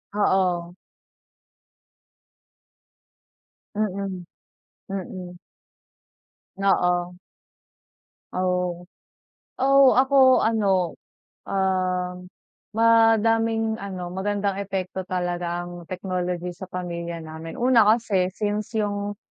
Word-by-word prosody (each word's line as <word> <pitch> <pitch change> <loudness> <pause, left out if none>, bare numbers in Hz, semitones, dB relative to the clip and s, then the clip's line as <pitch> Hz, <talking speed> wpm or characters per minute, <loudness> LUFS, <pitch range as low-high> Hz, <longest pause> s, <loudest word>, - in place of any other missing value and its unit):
Oo. 180 -4 +1 3.0
Mm. 195 -3 -3 0.7
Mm. 185 -2 -6 1.2
Oo. 180 -2 +1 1.2
Oh. 180 -1 -1 0.7
Oo, 275 0 +6
ako 260 -1 +5
ano, 195 -6 +1 0.5
um, 185 -1 -1 0.5
madaming 225 0 +4
ano, 180 -3 -6
magandang 200 +1 -1
epekto 190 -1 -3
talaga 175 -1 -3
ang 175 -1 -10
technology 180 -1 -3
sa 185 +1 -10
pamilya 170 -2 -5
namin. 160 0 -8
Una, 245 -1 +5
kasi 210 -5 +2
since 210 +3 -3
yung, 205 -1 -2
190 Hz, 70 wpm, -24 LUFS, 180-210 Hz, 3.0 s, Oo